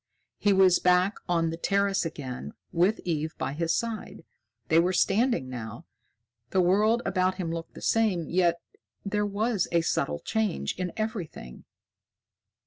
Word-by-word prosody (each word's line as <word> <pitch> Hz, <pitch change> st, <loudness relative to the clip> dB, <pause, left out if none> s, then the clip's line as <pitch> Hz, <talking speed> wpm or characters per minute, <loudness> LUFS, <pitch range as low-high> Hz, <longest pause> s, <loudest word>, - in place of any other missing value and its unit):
He 205 Hz, -, +3 dB
was 190 Hz, -2 st, +5 dB
back 180 Hz, +3 st, +3 dB
on 165 Hz, -2 st, +1 dB
the 165 Hz, -, -5 dB
terrace 200 Hz, +1 st, +1 dB
again, 130 Hz, -, -7 dB, 0.2 s
with 180 Hz, +5 st, +2 dB
Eve 160 Hz, -2 st, -2 dB
by 135 Hz, -, -3 dB
his 165 Hz, +2 st, -1 dB
side. 230 Hz, -2 st, -4 dB, 0.4 s
They 160 Hz, -, +5 dB
were 180 Hz, +2 st, +2 dB
standing 205 Hz, -, +2 dB
now. 115 Hz, -2 st, -7 dB, 0.6 s
The 190 Hz, -, +1 dB
world 210 Hz, +6 st, +3 dB
about 185 Hz, 0 st, +1 dB
him 180 Hz, -3 st, -3 dB
looked 165 Hz, 0 st, -6 dB
the -, -, -10 dB
same, 205 Hz, -8 st, +1 dB
yet 170 Hz, -1 st, +2 dB, 0.5 s
there 210 Hz, +1 st, 0 dB
was 205 Hz, 0 st, 0 dB
a 170 Hz, 0 st, +3 dB
subtle 75 Hz, -, 0 dB
change 220 Hz, -, -1 dB
in 180 Hz, -1 st, -2 dB
everything. 195 Hz, -, -5 dB
180 Hz, 145 wpm, -27 LUFS, 165-205 Hz, 0.6 s, was